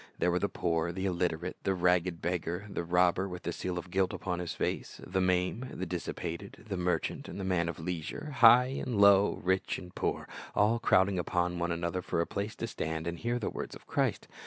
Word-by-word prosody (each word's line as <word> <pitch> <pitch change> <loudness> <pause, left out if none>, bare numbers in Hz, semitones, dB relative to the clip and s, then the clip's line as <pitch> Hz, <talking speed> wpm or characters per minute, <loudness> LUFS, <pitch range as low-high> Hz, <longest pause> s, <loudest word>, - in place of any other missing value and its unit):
There 90 - +2
were 90 - +1
the - - 0
poor, 85 0 0
the 95 +2 -3
illiterate, 90 -1 -1
the 95 - 0
ragged 90 -1 +1
beggar, 90 +2 -2
the 100 -4 -3
robber 90 +2 +2
with 90 0 -7
the - - -2
seal 90 -1 -3
of 90 0 -6
guilt 95 0 +1
upon 90 -2 -3
his 90 -2 -4
face, - - -3
the 95 +1 0
maimed, 90 +7 +1
the 95 - -1
dissipated, 90 +2 -5
the 100 - -2
merchant 90 -2 -1
and - - -7
the - - -3
man 90 -3 +1
of 85 - -5
leisure, 90 - -4
high 125 +3 +7
and 120 -5 -1
low, 100 0 +6
rich 95 +1 +1
and 90 -1 -10
poor, - - -2 0.3
all 110 +3 +3
crowding 95 -3 +3
upon 90 0 0
one 85 0 0
another 85 +2 -1
for 85 - -2
a 85 - +2
place 100 +4 -4
to - - -3
stand 80 -7 -3
and 85 0 -3
hear 120 +1 0
the 115 - -2
words - - -5
of - - -14
Christ. - - 0
90 Hz, 215 wpm, -31 LUFS, 85-95 Hz, 0.3 s, high